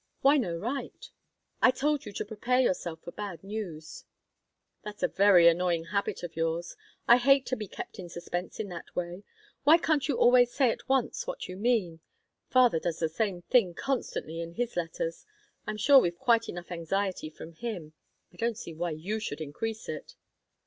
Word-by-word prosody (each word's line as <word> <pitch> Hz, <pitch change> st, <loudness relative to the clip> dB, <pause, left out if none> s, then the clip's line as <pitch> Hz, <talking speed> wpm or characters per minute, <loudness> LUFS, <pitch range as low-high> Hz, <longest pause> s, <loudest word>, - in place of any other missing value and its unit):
"Why 280 Hz, +2 st, +6 dB
no 175 Hz, -11 st, -1 dB
right?" 245 Hz, +10 st, -5 dB, 0.5 s
"I -, -, +7 dB
told 285 Hz, +3 st, 0 dB
you -, -, -6 dB
to -, -, -3 dB
prepare 235 Hz, +4 st, 0 dB
yourself 175 Hz, -9 st, 0 dB
for 175 Hz, -, -7 dB
bad 195 Hz, -5 st, -7 dB
news." 195 Hz, -7 st, -6 dB, 0.8 s
"That's 210 Hz, 0 st, -8 dB
a -, -, +5 dB
very 190 Hz, -4 st, +6 dB
annoying 170 Hz, 0 st, +3 dB
habit 200 Hz, -3 st, -1 dB
of 175 Hz, -, -6 dB
yours. 165 Hz, +1 st, -2 dB, 0.3 s
I 240 Hz, -, +8 dB
hate 275 Hz, +2 st, +4 dB
to 255 Hz, -, -1 dB
be 215 Hz, -4 st, -6 dB
kept -, -, -8 dB
in 175 Hz, -2 st, -7 dB
suspense 175 Hz, +1 st, -5 dB
in 215 Hz, -, -2 dB
that 175 Hz, -1 st, -9 dB
way. 175 Hz, +2 st, -4 dB, 0.4 s
Why 305 Hz, +4 st, +7 dB
can't 315 Hz, -4 st, +1 dB
you 280 Hz, -, 0 dB
always 245 Hz, 0 st, +5 dB
say 260 Hz, -4 st, +3 dB
at -, -, -8 dB
once 265 Hz, -, 0 dB
what -, -, -4 dB
you 185 Hz, -, -7 dB
mean? 200 Hz, -6 st, 0 dB, 0.5 s
Father 250 Hz, -9 st, +5 dB
does 165 Hz, 0 st, -2 dB
the 160 Hz, -, 0 dB
same 180 Hz, 0 st, -2 dB
thing 190 Hz, -8 st, +3 dB
constantly 175 Hz, -, -3 dB
in 170 Hz, 0 st, -6 dB
his 240 Hz, +4 st, -2 dB
letters. 165 Hz, -1 st, -3 dB, 0.4 s
I'm 215 Hz, 0 st, -3 dB
sure 275 Hz, +6 st, +7 dB
we've 175 Hz, -6 st, 0 dB
quite 230 Hz, -1 st, +2 dB
enough 175 Hz, 0 st, -7 dB
anxiety 180 Hz, 0 st, -2 dB
from 160 Hz, +1 st, -11 dB
him; 175 Hz, -6 st, -6 dB, 0.4 s
I -, -, -18 dB
don't 230 Hz, -1 st, -1 dB
see 165 Hz, -, -7 dB
why 170 Hz, +2 st, -2 dB
you 175 Hz, +8 st, -3 dB
should 155 Hz, -9 st, -5 dB
increase 215 Hz, +9 st, -5 dB
it." -, -, -7 dB
200 Hz, 185 wpm, -29 LUFS, 170-240 Hz, 0.8 s, I